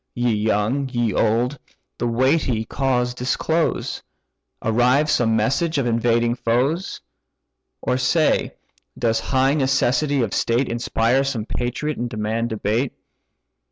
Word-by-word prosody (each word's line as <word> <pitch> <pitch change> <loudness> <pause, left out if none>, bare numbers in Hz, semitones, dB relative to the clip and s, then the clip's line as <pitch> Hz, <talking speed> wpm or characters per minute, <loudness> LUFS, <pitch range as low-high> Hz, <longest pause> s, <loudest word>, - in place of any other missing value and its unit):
Ye 120 0 +1
young, 110 +6 0
ye 120 -4 0
old, 120 +7 +1 0.4
the 120 - 0
weighty 125 -1 +1
cause 125 -1 0
disclose: 155 +6 -1 0.6
Arrives 125 +7 +3
some 115 -6 +2
message 140 +9 +1
of 135 - +1
invading 115 0 +2
foes? 125 +9 -1 0.8
Or 125 - 0
say, 155 +5 +1 0.4
does 115 -2 +1
high 130 +4 +1
necessity 135 0 +1
of 105 - -3
state 120 +3 +1
Inspire 120 +2 +1
some 125 -6 -2
patriot, 125 +6 -3
and 120 0 -2
demand 110 +1 -2
debate? 110 +4 -1
125 Hz, 120 wpm, -21 LUFS, 115-135 Hz, 0.8 s, Arrives